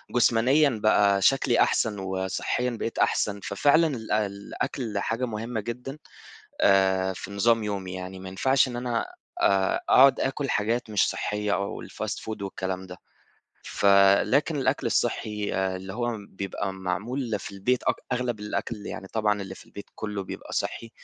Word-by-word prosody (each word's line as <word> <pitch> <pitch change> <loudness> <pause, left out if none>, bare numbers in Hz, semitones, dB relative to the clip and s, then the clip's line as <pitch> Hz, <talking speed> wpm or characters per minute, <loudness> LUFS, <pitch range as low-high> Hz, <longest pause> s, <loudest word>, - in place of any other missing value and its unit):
جسمانيًا 125 +5 +4
بقى 100 -2 +4
شكلي 135 +1 +3
أحسن، 105 -3 +2
وصحيًا 95 +6 -1
بقيت 115 - -3
أحسن. 100 -1 +1
ففعلًا 145 +10 +3
الأ 110 -6 -1
الأكل 100 +2 -4
حاجة 115 +5 -1
مهمة 115 0 -4
جدًا 125 +6 -6 0.6
آآ 95 -1 +3
في 95 +1 -8
نظام 115 +3 +2
يومي. 95 -3 -4
يعني 95 0 -6
ما 95 0 -8
ينفعش 130 +8 +2
إن 120 - -5
أنا 120 -1 -1 0.4
آآ 95 -1 +2
أقعد 135 +1 +6
أكل 135 0 -1
حاجات 115 +2 0
مش 105 - +3
صحية 105 -1 -1
أو 100 +2 -3
الfast - - -5
food 110 -2 -5
والكلام 95 -1 -4
ده. 90 0 -9 0.7
ف - - -2 0.4
لكن 150 +4 +1
الأكل 135 - 0
الصحي 105 -1 -1
اللي 95 0 -2
هو 120 -1 -1
بيبقى 95 0 -4
معمول 105 +6 -3
في - - -8
البيت، 120 +6 0
أك - - +2 0.2
أغلب 125 -3 -1
الأكل 105 0 -4
يعني 95 - -6
طبعًا 105 -2 0
اللي 95 -1 -7
في - - -15
البيت 100 - -10
كُله 105 -2 -4
بيبقى - - -8
صحّي، 115 - -3
105 Hz, 155 wpm, -26 LUFS, 95-120 Hz, 0.7 s, أقعد